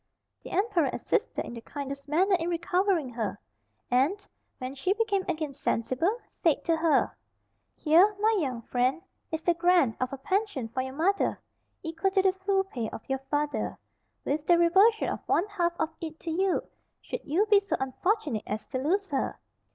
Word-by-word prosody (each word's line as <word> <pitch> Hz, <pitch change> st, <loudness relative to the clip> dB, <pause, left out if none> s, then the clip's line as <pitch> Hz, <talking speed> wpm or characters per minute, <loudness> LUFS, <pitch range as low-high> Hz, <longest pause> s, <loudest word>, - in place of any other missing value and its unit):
The -, -, -10 dB
emperor 380 Hz, -, +1 dB
assisted -, -, -1 dB
in -, -, -7 dB
the 230 Hz, -, -7 dB
kindest 280 Hz, +1 st, -7 dB
manner 375 Hz, +6 st, +3 dB
in 330 Hz, +1 st, -2 dB
recovering 350 Hz, -2 st, +1 dB
her; 230 Hz, -3 st, -3 dB, 0.5 s
and, 310 Hz, +12 st, +2 dB, 0.3 s
when 255 Hz, +1 st, -5 dB
she 280 Hz, +8 st, 0 dB
became 415 Hz, -3 st, 0 dB
again 310 Hz, -4 st, -2 dB
sensible, 275 Hz, -, 0 dB, 0.2 s
said 325 Hz, -5 st, +2 dB
to 330 Hz, -, +3 dB
her—"Here, 330 Hz, +3 st, +1 dB
my 440 Hz, +1 st, +3 dB
young 255 Hz, -7 st, -2 dB
friend, 255 Hz, +9 st, 0 dB, 0.3 s
is 320 Hz, 0 st, -3 dB
the 345 Hz, -, +3 dB
grant 340 Hz, -8 st, +3 dB
of 255 Hz, -, 0 dB
a 275 Hz, -, -5 dB
pension 330 Hz, -, -1 dB
for 255 Hz, +3 st, -2 dB
your 260 Hz, +1 st, -6 dB
mother, 385 Hz, +6 st, +1 dB, 0.4 s
equal 330 Hz, +3 st, 0 dB
to 385 Hz, 0 st, +2 dB
the 380 Hz, -1 st, +4 dB
full 385 Hz, 0 st, +1 dB
pay 240 Hz, -, -4 dB
of -, -, -9 dB
your 270 Hz, 0 st, -1 dB
father, 295 Hz, 0 st, -1 dB, 0.5 s
with 295 Hz, +2 st, -1 dB
the 345 Hz, -, +6 dB
reversion 385 Hz, +7 st, +5 dB
of -, -, -2 dB
one 350 Hz, -, +3 dB
half 355 Hz, -5 st, -1 dB
of 320 Hz, 0 st, 0 dB
it 320 Hz, -1 st, -6 dB
to 330 Hz, -, -4 dB
you, 375 Hz, +3 st, +1 dB, 0.4 s
should -, -, -5 dB
you 340 Hz, +9 st, +2 dB
be 410 Hz, -, +8 dB
so 400 Hz, -, -2 dB
unfortunate 265 Hz, -, -1 dB
as 215 Hz, +1 st, -3 dB
to 260 Hz, -, -2 dB
lose 380 Hz, +9 st, +1 dB
her. 275 Hz, -3 st, -1 dB
330 Hz, 175 wpm, -28 LUFS, 270-385 Hz, 0.5 s, be